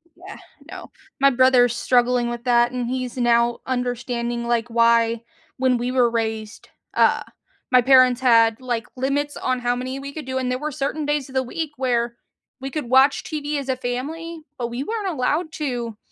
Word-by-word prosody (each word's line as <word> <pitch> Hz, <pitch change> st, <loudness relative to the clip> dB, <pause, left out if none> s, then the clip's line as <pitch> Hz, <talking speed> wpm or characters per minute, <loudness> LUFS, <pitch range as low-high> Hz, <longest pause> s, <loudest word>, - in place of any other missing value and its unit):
Yeah, 370 Hz, +3 st, -11 dB, 0.3 s
no. -, -, -9 dB, 0.3 s
My 275 Hz, +1 st, +6 dB
brother's 250 Hz, -2 st, +4 dB
struggling 245 Hz, 0 st, +2 dB
with 240 Hz, 0 st, -5 dB
that, 240 Hz, 0 st, +3 dB
and 250 Hz, -1 st, -3 dB
he's 255 Hz, 0 st, -4 dB
now 235 Hz, -1 st, +2 dB
understanding, 245 Hz, -1 st, -2 dB
like, 235 Hz, 0 st, 0 dB
why, 230 Hz, 0 st, +3 dB, 0.3 s
when 255 Hz, -1 st, +2 dB
we 245 Hz, +1 st, -2 dB
were 250 Hz, -2 st, +3 dB
raised, 220 Hz, -2 st, -4 dB, 0.2 s
uh, -, -, +3 dB, 0.5 s
my 250 Hz, -, +6 dB
parents 255 Hz, -1 st, +5 dB
had, 230 Hz, -2 st, +4 dB
like, 240 Hz, -3 st, -3 dB
limits 280 Hz, +3 st, -1 dB
on 255 Hz, -1 st, -1 dB
how 245 Hz, 0 st, 0 dB
many 255 Hz, +2 st, -4 dB
we 280 Hz, +1 st, -8 dB
could 310 Hz, -2 st, -7 dB
do, 260 Hz, 0 st, -3 dB
and 255 Hz, -1 st, -1 dB
there 250 Hz, 0 st, -1 dB
were 305 Hz, +2 st, -3 dB
certain 295 Hz, +2 st, -3 dB
days 295 Hz, -2 st, -1 dB
of 265 Hz, -, -13 dB
the 260 Hz, -, +2 dB
week 310 Hz, +4 st, -4 dB
where, 240 Hz, -2 st, 0 dB, 0.5 s
we 270 Hz, -, -4 dB
could 295 Hz, -5 st, -4 dB
watch 265 Hz, +2 st, +4 dB
TV 295 Hz, -1 st, -3 dB
as 275 Hz, -, -7 dB
a 260 Hz, -, 0 dB
family, 300 Hz, +7 st, -5 dB, 0.2 s
but 235 Hz, -1 st, -3 dB
we 240 Hz, +2 st, -4 dB
weren't 430 Hz, +1 st, -3 dB
allowed 310 Hz, +2 st, -1 dB
to, 245 Hz, -8 st, -4 dB
250 Hz, 185 wpm, -22 LUFS, 240-275 Hz, 0.5 s, My